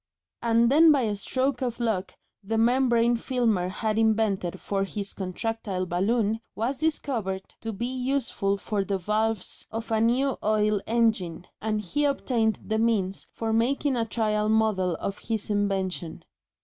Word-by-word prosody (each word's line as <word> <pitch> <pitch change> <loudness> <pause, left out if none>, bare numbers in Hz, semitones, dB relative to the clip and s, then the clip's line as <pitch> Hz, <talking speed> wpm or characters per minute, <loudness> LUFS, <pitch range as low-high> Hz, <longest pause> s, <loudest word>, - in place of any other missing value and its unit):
And 235 +1 +3
then 315 +3 +7
by 285 -3 +4
a 210 -2 0
stroke 260 +5 -1
of 245 -2 -2
luck 220 -6 -1 0.3
the 220 +3 -1
membrane 240 0 +3
Filmer 230 -7 0
had 215 +2 -1
invented 210 -5 +1
for 195 -1 -1
his 200 0 -4
contractile 195 0 -3
balloon 210 +5 +1 0.2
was 250 +5 -2
discovered 235 -11 -1 0.2
to 225 - -3
be 220 +3 -3
useful 250 -6 -1
for 205 0 -2
the 195 0 -1
valves 215 +2 -1
of 225 +1 -5
a 220 -1 +2
new 255 +4 +2
oil 210 -1 +2
engine, 215 -8 +1 0.2
and 215 0 0
he 210 +10 -1
obtained 240 -6 +1
the 220 0 0
means 205 -4 0
for 225 -1 -2
making 265 +4 +1
a 235 - +1
trial 215 -2 0
model 215 -5 +2
of 195 +4 -4
his 220 -2 -2
invention. 190 -4 -1
220 Hz, 150 wpm, -26 LUFS, 200-235 Hz, 0.3 s, then